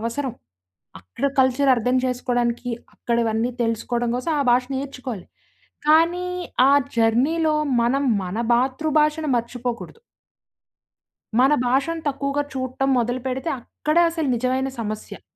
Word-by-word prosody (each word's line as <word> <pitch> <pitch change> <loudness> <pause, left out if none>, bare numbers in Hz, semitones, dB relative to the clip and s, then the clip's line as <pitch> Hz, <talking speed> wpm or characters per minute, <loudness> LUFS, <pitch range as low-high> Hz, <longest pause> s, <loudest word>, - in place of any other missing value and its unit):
అవసరం. 235 +3 -3 0.7
అక్కడ 95 - -3
కల్చర్ 260 +1 +3
అర్థం 250 +3 +1
జేసుకోడానికి, 245 -1 -1 0.2
అక్కడివన్నీ 235 0 0
తెలుసుకోడం 235 +1 -1
కోసం 285 +6 -2
ఆ - - +3
భాష 250 +1 +4
నేర్చుకోవాలి. 255 -7 -6 0.6
కానీ 335 +3 +4 0.4
ఆ - - +5 0.2
జర్నీలో, 285 +8 +2 0.3
మనం 275 +4 +1 0.2
మన 185 +3 -5 0.2
మాతృభాషను 300 +4 +1
మర్చిపోకూడదు. 240 - -4 1.4
మన 270 +3 +5
భాషను 280 +6 0
తక్కువగా 280 +1 -1
చూట్టం 260 +1 -2
మొదలు 245 +2 -1
పెడితే, 260 +5 -2
అక్కడే 305 +7 0
అసలు 320 -4 -2
నిజమైన 260 +2 0
సమస్య. 215 -1 -6
255 Hz, 110 wpm, -22 LUFS, 235-285 Hz, 1.4 s, ఆ